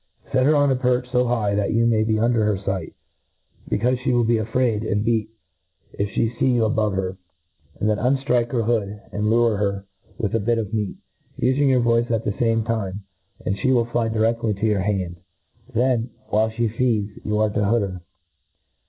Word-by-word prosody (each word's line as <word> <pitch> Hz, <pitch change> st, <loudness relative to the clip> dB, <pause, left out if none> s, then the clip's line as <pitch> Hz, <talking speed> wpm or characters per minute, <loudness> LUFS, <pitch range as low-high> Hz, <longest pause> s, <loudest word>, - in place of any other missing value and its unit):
Set 130 Hz, 0 st, +3 dB
her 155 Hz, -, +4 dB
on 145 Hz, -1 st, +3 dB
a -, -, +3 dB
perch 125 Hz, 0 st, 0 dB
fo 125 Hz, 0 st, +2 dB
high 110 Hz, -4 st, 0 dB
that 100 Hz, 0 st, 0 dB
you 115 Hz, +1 st, +3 dB
may 110 Hz, -2 st, +3 dB
be 110 Hz, 0 st, +1 dB
under 115 Hz, 0 st, +2 dB
her 105 Hz, -2 st, +1 dB
fight, 95 Hz, -3 st, -4 dB, 0.7 s
becaufe 125 Hz, +4 st, +1 dB
* -, -, -14 dB
(he 130 Hz, -, +1 dB
will 120 Hz, -1 st, +3 dB
be 115 Hz, 0 st, +2 dB
afraid, 115 Hz, 0 st, 0 dB
and 105 Hz, -1 st, -1 dB
beat, 110 Hz, -2 st, +1 dB, 0.6 s
if 100 Hz, 0 st, -2 dB
flie 115 Hz, +1 st, -1 dB
fee 130 Hz, -2 st, +3 dB
you 115 Hz, -2 st, +3 dB
a 110 Hz, -, +1 dB
bove 110 Hz, -3 st, +1 dB
her; 95 Hz, 0 st, -2 dB, 0.6 s
then 105 Hz, 0 st, +1 dB
unftrik'e 125 Hz, -2 st, +1 dB
her 120 Hz, -3 st, 0 dB
hood, 105 Hz, -3 st, -1 dB
and 105 Hz, +1 st, -1 dB
lure 115 Hz, -1 st, +3 dB
her 100 Hz, -1 st, -1 dB, 0.3 s
with 105 Hz, -4 st, -2 dB
a 115 Hz, -, +2 dB
bit 115 Hz, +3 st, +1 dB
of 110 Hz, -1 st, -3 dB
meat, 105 Hz, -3 st, -2 dB, 0.4 s
ufing 130 Hz, +3 st, +2 dB
your 130 Hz, -2 st, +3 dB
voice 120 Hz, 0 st, +2 dB
at 115 Hz, -1 st, -1 dB
the -, -, +1 dB
fame 115 Hz, +2 st, +1 dB
time, 105 Hz, -4 st, -3 dB, 0.4 s
and 100 Hz, -1 st, -1 dB
flie 130 Hz, -, +2 dB
will 120 Hz, -3 st, +3 dB
fly 120 Hz, -1 st, -1 dB
direftly 110 Hz, -1 st, 0 dB
to 110 Hz, -, 0 dB
your 105 Hz, -3 st, +2 dB
hand. 95 Hz, -3 st, -2 dB, 0.5 s
Then, 120 Hz, 0 st, +1 dB, 0.2 s
while 110 Hz, +1 st, +2 dB
flic 110 Hz, 0 st, -1 dB
feeds, 110 Hz, -5 st, 0 dB
you 105 Hz, 0 st, -1 dB
are 110 Hz, 0 st, +2 dB
to 105 Hz, -, 0 dB
hood 115 Hz, +3 st, +2 dB
her. 95 Hz, -2 st, -5 dB
115 Hz, 205 wpm, -22 LUFS, 105-120 Hz, 0.7 s, her